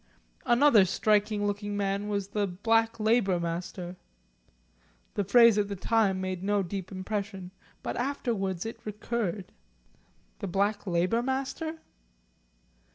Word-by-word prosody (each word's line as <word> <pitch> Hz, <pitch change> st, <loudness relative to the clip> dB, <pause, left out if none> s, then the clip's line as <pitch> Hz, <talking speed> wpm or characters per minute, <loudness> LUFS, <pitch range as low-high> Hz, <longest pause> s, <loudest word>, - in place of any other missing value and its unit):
Another 240 Hz, -3 st, +6 dB
striking 210 Hz, +2 st, +1 dB
looking 205 Hz, 0 st, -2 dB
man 200 Hz, 0 st, -1 dB
was 200 Hz, -2 st, -2 dB
the 205 Hz, 0 st, 0 dB
Black 225 Hz, +5 st, +1 dB
Labour 215 Hz, -4 st, +2 dB
Master. 175 Hz, +1 st, -4 dB, 1.2 s
The 205 Hz, -, 0 dB
phrase 230 Hz, +2 st, +6 dB
at 205 Hz, -, +1 dB
the 200 Hz, -, -4 dB
time 195 Hz, -1 st, +1 dB
made 185 Hz, -1 st, -3 dB
no 205 Hz, 0 st, +1 dB
deep 190 Hz, +1 st, -5 dB
impression, 195 Hz, -1 st, -4 dB, 0.3 s
but -, -, -3 dB
afterwards 225 Hz, -9 st, -2 dB
it 225 Hz, -, -6 dB
recurred; 210 Hz, -2 st, -3 dB, 0.9 s
the 200 Hz, -, -4 dB
Black 200 Hz, +3 st, 0 dB
Labour 180 Hz, +6 st, +1 dB
Master? 270 Hz, +5 st, -3 dB
205 Hz, 120 wpm, -28 LUFS, 190-225 Hz, 1.2 s, Another